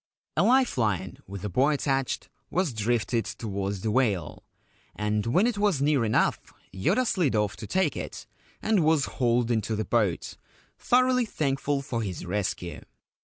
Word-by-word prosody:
A - - +3
life 255 - +3
line 95 -5 -1
with 100 0 -7
a - - 0
buoy 135 - +3
attached 135 -2 -1 0.2
was 180 -7 0
drifted 115 +1 0
towards 100 -3 -4
the 110 - -1
whale, 105 - 0 0.5
and 105 +1 -1
when 180 - +3
it 235 -4 0
was 205 -8 +2
near 140 -3 +2
enough 110 -1 +2 0.3
Yoda 95 - +1
slid 175 - +1
off 105 -2 +1
to - - -7
take 185 -7 +1
it, - - -6 0.4
and 215 -6 +3
was 155 -3 +3
hauled 120 -1 +1
into 110 -1 0
the 110 0 -2
boat, 105 -8 0 0.4
thoroughly 250 -1 +3
thankful 140 -3 -1
for 120 -4 -3
his 95 -4 -4
rescue. 90 -2 -3
120 Hz, 160 wpm, -27 LUFS, 105-155 Hz, 0.5 s, A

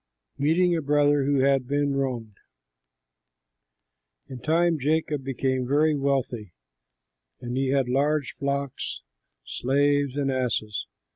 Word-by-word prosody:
MEETING 170 +5 +3
A 165 - -1
BROTHER 145 -1 +2
WHO 140 -1 +2
HAD 135 -2 +2
BEEN 145 0 0
WRONGED 120 -7 -3 1.9
In 130 - -7
time 165 +3 +2
Jacob 150 0 0
became 130 -1 -1
very 150 +3 +3
wealthy, 130 -8 -2 0.9
and 120 0 -5
he 135 +1 0
had 135 -1 +1
large 145 +3 0
flocks, 140 -1 -3 0.4
slaves, 145 +1 +1
and 140 -1 0
asses. 115 -5 -2
140 Hz, 115 wpm, -25 LUFS, 130-145 Hz, 1.9 s, MEETING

